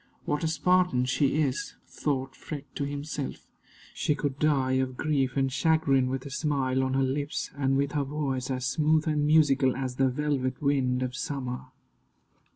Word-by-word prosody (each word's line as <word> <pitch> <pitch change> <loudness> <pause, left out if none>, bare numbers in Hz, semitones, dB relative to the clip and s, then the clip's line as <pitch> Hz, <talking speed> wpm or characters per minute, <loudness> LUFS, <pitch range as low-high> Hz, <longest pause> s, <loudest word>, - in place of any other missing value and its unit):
"What 150 +1 -1
a - - +2
Spartan 180 -5 +2
she 140 +4 +2
is!" 135 -2 -2
thought 135 -2 -3
Freke 145 -2 -8
to 140 - -2
himself. 145 0 -5 0.5
"She 150 - 0
could 145 -2 -3
die 140 -4 +2
of 130 -1 -3
grief 140 -4 0
and 135 -1 +1
chagrin 140 -5 +2
with 130 0 -3
a 140 - -7
smile 135 -3 0
on 130 0 0
her 135 - +3
lips, 140 +3 -2
and 135 -1 +1
with 140 0 0
her 145 -1 0
voice 135 -3 -2
as 130 -1 -2
smooth 155 +4 +2
and 150 -1 +1
musical 140 -4 +4
as 130 -1 -4
the 135 -1 +3
velvet 130 -2 -1
wind 130 -3 +1
of 125 0 -3
summer." 130 -4 -4
140 Hz, 170 wpm, -28 LUFS, 130-150 Hz, 0.5 s, musical